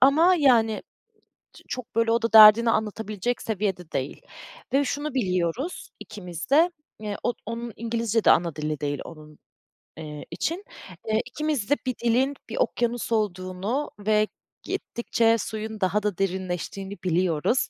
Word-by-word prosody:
ama 315 +7 +6
yani 240 -9 +3 0.7
ç - - -16
çok 250 0 -6
böyle 230 0 +2
o 230 0 +1
da 230 - -1
derdini 220 +1 +9
anlatabilecek 220 +1 -2
seviyede 190 -5 -2
değil 135 +1 -3 0.5
ve 280 +2 +3
şunu 290 +1 -3
biliyoruz 190 - -1
ikimiz 180 -5 -8
de, 320 +5 +5 0.3
eee, 210 -1 -4
od 240 - 0
onun 230 +1 -5
İngilizce 230 -1 -1
de - - +6
ana 170 -3 +3
dili 150 -1 -3
değil 145 -2 -2
onun, 155 -2 -12 0.6
eee, 150 -2 -7
için. 340 +6 -2 0.4
Eee, 220 0 +2
ikimiz 280 -3 -2
de 290 - +5
bir 255 -1 -1
dilin 250 +4 +2 0.2
bir - - -5
okyanus 240 - 0
olduğunu 200 +4 -1
ve 215 +1 +2 0.4
gittikçe 230 -1 0
suyun 220 0 -5
daha 195 +3 +1
da 205 -4 -1
derinleştiğini 190 +1 -3
biliyoruz. 180 - +1
220 Hz, 140 wpm, -25 LUFS, 185-245 Hz, 0.7 s, derdini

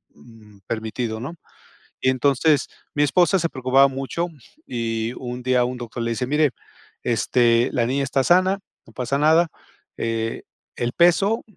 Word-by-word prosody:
mm, 105 +5 -18
permitido, 110 0 -3
¿no? 135 +9 -6 0.6
Y 130 - +2
entonces, 140 +3 +2 0.3
mi 145 - 0
esposa 180 +6 +3
se 170 0 0
preocupaba 130 0 +4
mucho, 135 +6 -3 0.4
y 115 -1 -2
un 125 0 -6
día 125 0 +2
un 125 +1 -4
doctor 120 -1 -5
le 115 - -1
dice: 125 +2 -2
"Mire, 150 0 +2 0.5
este, 120 +1 +2
la 120 -4 +1
niña 135 +2 0
está 135 0 0
sana, 185 +5 +3 0.3
no 115 - -18
pasa 125 +3 -1
nada. 160 +4 +4 0.5
Eh, 115 0 -2 0.3
el 120 +1 -2
peso 195 +6 +3
125 Hz, 150 wpm, -22 LUFS, 115-150 Hz, 0.6 s, preocupaba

